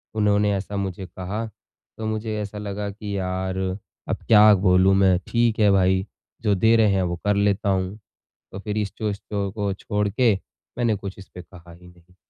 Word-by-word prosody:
उन्होंने 105 -1 +2
ऐसा 100 +1 -4
मुझे 95 -1 -4
कहा, 95 +4 -5 0.5
तो 110 - -5
मुझे 110 0 -2
ऐसा 105 0 -6
लगा 105 0 -4
कि 100 0 -5
यार 95 0 -2 0.5
अब - - 0
क्या 105 -1 +8
बोलूँ 95 0 +4
मैं, 95 -2 +4
ठीक 115 -2 +1
है 105 -1 +5
भाई, 95 0 +3 0.4
जो 105 -3 +2
दे 110 +4 +4
रहे 110 -3 +4
हैं 95 -1 +1
वो 85 -1 -2
कर 105 0 +3
लेता 100 0 +1
हूँ। 95 +1 -1 0.5
तो 95 - -7
फिर 105 +1 -4
इस 105 -1 0 0.2
स्टोर 105 -1 0 0.4
को 100 -1 -2
छोड़ 105 +1 -2
के 115 +2 +3 0.4
मैंने 120 -3 +1
कुछ 100 -1 -7
इसपे 95 -1 -11
कहा 85 -1 -15
ही 90 +1 -16
नहीं। 90 +1 -21
100 Hz, 185 wpm, -23 LUFS, 95-105 Hz, 0.5 s, क्या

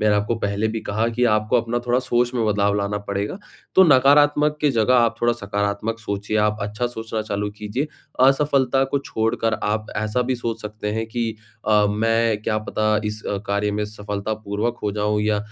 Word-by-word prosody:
मैंने 105 -1 +3
आपको 105 +3 0
पहले 100 0 -1
भी 110 0 -3
कहा 110 +2 -1
कि 125 +2 +2
आपको 110 +2 +3
अपना 120 +1 -2
थोड़ा 120 +1 +3
सोच 120 -1 0
में 115 -2 +1
बदलाव 100 -1 +2
लाना 100 +1 -1
पड़ेगा। 100 - -2 0.4
तो 190 - +8
नकारात्मक 145 +1 +5
के 150 -2 +3
जगह 115 +1 +2
आप 115 -1 +3
थोड़ा 120 0 +3
सकारात्मक 105 +1 -2
सोचिए 100 0 -3
आप 105 0 +1
अच्छा 105 +4 -2
सोचना 110 -2 -4
चालू 105 -1 -2
कीजिए, 110 +8 -2 0.4
असफलता 135 -1 +3
को 140 +1 -1
छोड़कर 115 -3 -1
आप 105 +1 -1
ऐसा 110 +3 0
भी 130 - +2
सोच 115 -1 -4
सकते 105 0 -4
हैं 110 +1 -2
कि 115 -1 -2 0.3
अ, 105 -1 +5
मैं 115 0 +1
क्या 110 0 0
पता 110 0 0
इस 105 0 -4
अ, 100 - -2
कार्य 100 +1 0
में 105 0 -1
सफलतापूर्वक 105 +2 -3
हो 105 - -1
जाऊँ 105 0 0
या 105 -1 +1
110 Hz, 190 wpm, -22 LUFS, 105-120 Hz, 0.4 s, तो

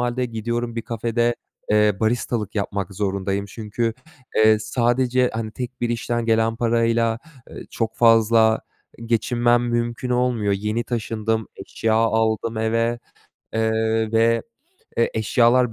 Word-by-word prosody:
hâlde 125 +1 0
gidiyorum 120 0 -3
bir 115 - -2
kafede, 120 +1 0 0.4
eee, 105 -1 +4
baristalık 115 -1 -1
yapmak 100 -2 -3
zorundayım 100 0 -1
çünkü, 110 +2 -3 0.4
eee, 110 0 +5
sadece, 120 +3 +1
hani, 110 -1 -3
tek 125 +1 -6
bir 120 - 0
işten 120 0 -2
gelen 115 0 +2
parayla, 115 -1 +1 0.3
eee, - - -9
çok 115 -1 -3
fazla 115 -1 +4 0.5
geçinmem 120 +1 +2
mümkün 120 +1 -2
olmuyor. 125 -4 +1
Yeni 105 +4 -1
taşındım, 110 -1 -2
eşya 110 +3 -2
aldım 110 0 +1
eve, 115 +1 0 0.6
eee, 110 0 0
ve, 115 +1 +3 0.5
eee, 115 - +2
eşyalar 120 +2 +3
115 Hz, 120 wpm, -22 LUFS, 110-120 Hz, 0.6 s, eee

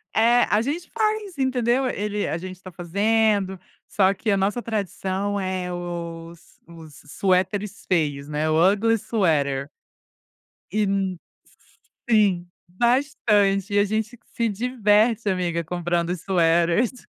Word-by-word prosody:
eh, 235 +2 +5
a 210 - +3
gente 305 +8 -3
faz, 430 -5 -1
entendeu. 260 -1 +1
Ele 210 -3 -2
a - - -2
gente 185 +1 -8
tá 185 -1 -10
fazendo, 200 +2 +1 0.3
só 195 -1 +2
que 215 - -4
a 200 - +2
nossa 200 +5 0
tradição 200 -2 -2
é, 185 -1 -3
os 170 -1 -7
os 160 -3 -13
suéteres 190 +5 -1
feios, 145 -5 0
né, 150 +1 -1
o 165 +4 +5
ugly 225 +3 +1
sweater 145 - 0 1.0
e, 215 +1 +1
hum 195 -2 -1 0.9
sim! 200 -5 +3 0.2
Bastante, 205 -3 +1
e - - +4
a 205 - +5
gente 220 +3 -3 0.2
se 230 -1 0
diverte, 220 0 +2
amiga, 175 -2 -1
comprando 175 0 -1
sweaters. 175 +7 +1
195 Hz, 125 wpm, -23 LUFS, 175-220 Hz, 1.0 s, eh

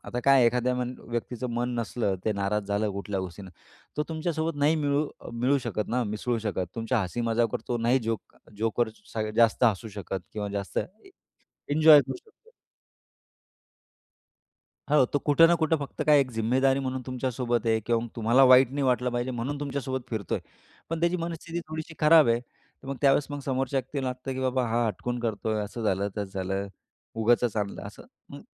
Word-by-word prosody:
आता 125 - -4
काय 135 -3 +6
एखाद्या 125 +1 +1
मन 125 0 -3
व्यक्तीचं 120 +1 -4
मन 120 +1 -1
नसलं 110 -4 -1
ते 110 - +1
नाराज 100 +1 -1
झालं 105 +1 0
कुठल्या 100 -1 -3
गोष्टीनं. 95 +1 -8 0.5
तो 150 - +1
तुमच्यासोबत 160 0 -2
नाही 150 +3 +3
मिळू 145 0 +1 0.2
अ, - - -9
मिळू 130 +4 +2
शकत 105 -4 -3
ना, 125 +1 0
मिसळू 110 +3 -2
शकत. 100 -4 -2
तुमच्या 115 +1 0
हसी-मजाकवर 115 +3 -1
तो 120 -1 0
नाही 120 +3 +3
जोक 115 -3 -4 0.2
जोकर 115 +1 +1 0.3
स 110 -1 -1
जास्त 115 +1 +4
हसू 110 0 +1
शकत 100 -2 -5
किंवा 105 -1 -3
जास्त 100 -1 -3
ए 215 - -7 0.6
एन्जॉय 155 -1 +8
करू - - -5
शकतो. 450 +1 -25 2.4
हो, 150 -4 +6
तो 145 - -1
कुठं 160 +3 +5
ना 170 - +4
कुठं 160 -1 +1
फक्त 140 -1 -6
काय 150 -2 +6
एक 130 -2 0
जिम्मेदारी 130 +4 +2
म्हणून 130 -1 -3
तुमच्यासोबत 125 -2 -2
आहे 110 0 +2
किंवा 115 +1 0
मग - - -5
तुम्हाला 120 +4 +4
वाईट 130 -1 +7
नाही 140 0 -2
वाटलं 125 -1 +2
पाहिजे 120 +1 -2
म्हणून 130 +4 -3
तुमच्यासोबत 135 -2 -3
फिरतोय. 110 -4 -2 0.5
पण 165 -1 -2
त्याची 170 +1 +1
मनस्थिती 170 0 -4
थोडीशी 155 0 -6
खराब 155 -2 +6
आहे. 115 +1 +3
तर 125 +2 -20
मग 140 - -3
त्यावेळेस 140 0 +4
मग 145 0 -4
समोरच्या 135 0 -1
व्यक्तीला 130 +1 -4
लागतं 130 +1 -4
की 130 - -4
बाबा 130 -1 0
हा 120 +1 +1
हटकून 120 +3 -3
करतोय. 110 -1 -2
असं 110 +3 -6
झालं, 100 0 0
तसं 105 - 0 0.2
झालं, 95 +2 -2 0.5
उगाचच 115 0 +2
आणलं 100 -1 -3
असं. - - -12 0.2
मग - - -10
125 Hz, 180 wpm, -27 LUFS, 110-140 Hz, 2.4 s, एन्जॉय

